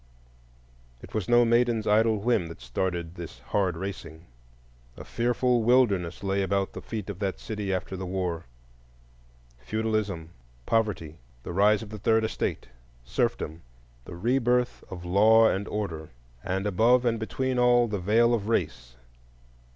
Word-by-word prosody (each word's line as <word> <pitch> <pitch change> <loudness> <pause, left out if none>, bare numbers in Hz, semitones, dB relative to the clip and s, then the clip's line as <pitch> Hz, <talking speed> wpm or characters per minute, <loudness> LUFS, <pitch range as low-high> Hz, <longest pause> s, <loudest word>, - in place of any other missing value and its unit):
It - - -12
was 110 0 -2
no 120 0 +6
maiden's 120 -1 +2
idle 110 +1 +3
whim 105 -4 +1
that 85 - -10
started 85 +6 -3
this 85 -2 -9
hard 95 -4 -1
racing; 95 -4 -7 0.7
a - - -8
fearful 120 +1 +1
wilderness 105 -8 +2
lay 100 0 0
about 95 0 -1
the - - -7
feet 110 -4 -6
of 100 -3 -6
that 100 -2 -2
city 105 -3 -4
after 95 0 -3
the 95 0 -5
War,—feudalism, - - -5 0.3
poverty, 95 -9 -1 0.2
the - - -6
rise 105 +3 +3
of 105 - -10
the 105 - -7
Third 110 +2 +2
Estate, 110 - -3 0.4
serfdom, 80 +5 -2 0.4
the 90 - -9
re 120 +9 +1
birth 125 0 0
of 90 -1 -8
Law 110 +5 +5
and 100 0 -1
Order, 85 -7 -4 0.3
and 95 +2 -2
above 115 +6 +3
and 115 -1 +1
between 130 +3 -2
all, 120 -1 +4
the 105 -3 -3
Veil 115 +6 +3
of 110 -2 -1
Race. 70 - -2
100 Hz, 145 wpm, -27 LUFS, 85-115 Hz, 0.7 s, no